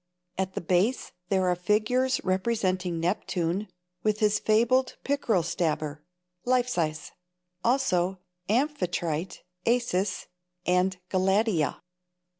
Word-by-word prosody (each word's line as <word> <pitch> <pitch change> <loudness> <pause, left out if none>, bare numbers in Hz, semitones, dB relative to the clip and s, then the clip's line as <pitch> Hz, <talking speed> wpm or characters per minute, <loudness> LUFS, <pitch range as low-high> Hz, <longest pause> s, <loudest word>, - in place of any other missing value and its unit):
At 190 0 -2
the - - -2
base 185 +9 +1 0.2
there 190 -2 +2
are 180 - +3
figures 220 +8 +1
representing 185 -3 0
Neptune 180 +1 -1 0.3
with 215 +1 +1
his 210 -1 +3
fabled 240 +4 +2
pickerel 240 -10 +1
stabber, 155 -3 -2 0.4
life 250 0 +2
size; 155 -9 -2 0.5
also 195 -8 +2 0.3
Amphitrite, 180 - -1 0.2
Acis 210 -6 +1 0.4
and 180 +1 +2
Galatea. 190 -4 +1
190 Hz, 95 wpm, -27 LUFS, 180-230 Hz, 0.5 s, are